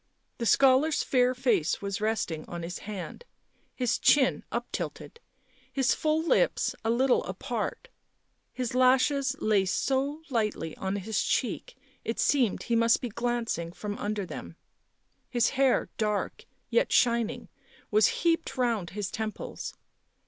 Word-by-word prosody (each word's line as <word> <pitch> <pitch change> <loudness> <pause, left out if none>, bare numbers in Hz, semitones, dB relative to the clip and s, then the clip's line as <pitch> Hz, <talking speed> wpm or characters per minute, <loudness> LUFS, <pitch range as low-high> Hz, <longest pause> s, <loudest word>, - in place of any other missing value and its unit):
The 235 - -1
scholar's 275 +5 +4
fair 255 -1 +2
face 220 - +1
was 200 0 -4
resting 210 -8 -1
on 170 -1 -5
his 175 +1 -5
hand, 200 - -6 0.5
his 250 -3 0
chin 270 -3 +4
up - - -2
tilted, 465 - -5 0.5
his 265 -1 +2
full 310 +1 0
lips - - +2
a 225 - 0
little 250 +2 +3
apart; - - -4 0.6
his 250 -2 -3
lashes 260 +2 +3
lay 210 -3 +3
so 275 - -1
lightly 210 -9 -1
on 190 +1 -2
his 205 +2 -1
cheek 245 +1 -1 0.3
it 225 - -3
seemed 255 -8 +2
he 235 - 0
must 230 0 +4
be 245 - -4
glancing 230 -7 -2
from 205 +3 -5
under 205 -1 -2
them; - - -8 0.7
his 240 -3 +2
hair, 270 -1 +2
dark, 210 -2 -1 0.3
yet - - +2
shin 235 -2 +3
ing, 240 - -9 0.4
was 215 0 +5 0.2
heaped 330 -4 +1
round 230 -8 0
his 205 0 -4
temples. 220 -1 -5
235 Hz, 140 wpm, -28 LUFS, 210-260 Hz, 0.7 s, was